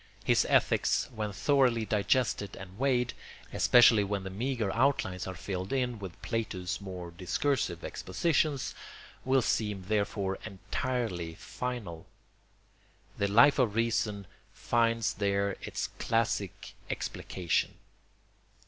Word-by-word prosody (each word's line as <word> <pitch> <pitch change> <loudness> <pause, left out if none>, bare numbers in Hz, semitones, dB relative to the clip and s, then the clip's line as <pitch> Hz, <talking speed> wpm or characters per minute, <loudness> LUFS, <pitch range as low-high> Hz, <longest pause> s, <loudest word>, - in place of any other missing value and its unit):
His - - +3
ethics, - - +2
when 105 -2 -3
thoroughly 120 +1 +2
digested 105 -1 +1
and 95 +2 -11
weighed, 125 -3 +1 0.4
especially 120 -3 +6
when 100 -1 -2
the 95 - -6
meagre 115 -1 -1
outlines 115 -8 +1
are 95 - -5
filled 95 0 -4
in 125 -4 0
with 95 -3 -8
Plato's 100 -6 -3
more 90 -3 -7
discursive 90 - -1
expositions, 140 - 0 0.5
will 130 -1 +3
seem 105 -5 -1
therefore 100 -1 -1
entirely 100 -4 -3
final. 110 -11 -5 1.1
The 100 - +2
Life 120 +8 +6
of 115 -5 +2
Reason 110 -3 0 0.3
finds 115 -1 +1
there 100 -1 0
its - - -3
classic 115 -5 -1 0.2
explication. 90 -4 -2
105 Hz, 110 wpm, -30 LUFS, 95-125 Hz, 1.1 s, especially